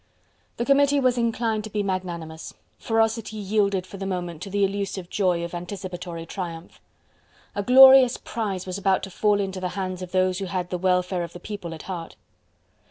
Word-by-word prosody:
The 235 - -1
Committee 280 +1 +4
was 255 -2 +3
inclined 230 -2 0
to - - -7
be 210 0 -1
magnanimous. 170 -4 -4 0.2
Ferocity 225 -1 0
yielded 200 -2 0
for 195 - -10
the 195 0 -4
moment 175 -4 -4
to 200 - -6
the 200 +1 +1
elusive 195 -2 -4
joy 180 -4 +1
of 170 - -6
anticipatory 175 -2 -6
triumph. 170 -1 -7 0.7
A 205 - -2
glorious 260 +2 +8
prize 200 -5 -4
was 185 +1 -4
about 195 -1 +2
to 195 - -6
fall 205 +2 +2
into 190 -1 -3
the 185 -1 -2
hands 185 -1 -3
of 180 -1 -7
those 185 0 +1
who 195 - -3
had 180 -1 -3
the 180 - -2
welfare 180 0 +1
of 170 - -6
the 175 - -9
people 205 -5 -6
at 160 - -10
heart. 175 -3 -6
190 Hz, 185 wpm, -24 LUFS, 180-210 Hz, 0.7 s, glorious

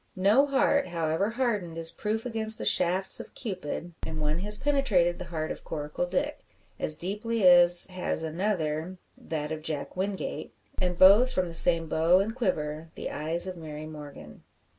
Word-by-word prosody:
No 205 +9 +4
heart, 280 +1 +2
however 165 +3 -1
hardened, 220 -9 -2
is 165 0 +1
proof 220 +2 -3
against 220 -2 +1
the - - -5
shafts 185 +3 +2
of - - -10
Cupid; 175 - -5
and 160 -1 -5
one 150 +2 -1
has 210 +2 +3
penetrated 225 -12 +1
the 180 - -6
heart 160 -2 -4
of - - -7
Coracle 150 +3 -4
Dick, 290 +12 -2 0.4
as 155 - +1
deeply 210 +4 -1
as 175 0 +6
has 185 -3 -3
another 165 0 -2 0.2
that 150 -2 -5
of 155 -1 -4
Jack 155 -2 -4
Wingate. 190 +1 -4 0.3
And 180 -1 -1
both 205 +8 +7
from 185 -5 0
the 170 - -7
same 165 0 +3
how 165 +3 +4
and 200 +4 0
quiver 160 -9 -2
the - - -5
eyes 165 +3 -2
of 185 -1 -5
Mary 155 -2 -8
Morgan. 145 - -11
175 Hz, 170 wpm, -27 LUFS, 160-210 Hz, 0.4 s, both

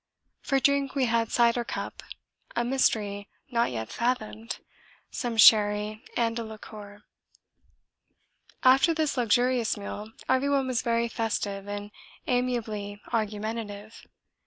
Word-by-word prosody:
For 275 -1 +1
drink 280 0 +2
we 270 -2 +2
had 230 -1 +1
cider 235 0 +3
cup, - - -5 0.5
a 240 - +1
mystery 210 -6 0 0.2
not 235 -1 +2
yet 110 -1 -5
fathomed, 230 -2 -2 0.5
some 240 -4 -3
sherry 210 0 +5
and 230 0 +1
a - - -3
liqueur. 210 -2 -10 1.6
After 270 +6 +5
this 310 -3 0
luxurious 245 -1 +2
meal 205 +1 -7 0.2
everyone 270 +1 +2
was 255 -2 0
very 235 0 +1
festive 205 -3 -2
and 205 0 -5 0.3
amiably 225 -5 -1
argumentative. 215 -1 -4
230 Hz, 110 wpm, -27 LUFS, 210-250 Hz, 1.6 s, sherry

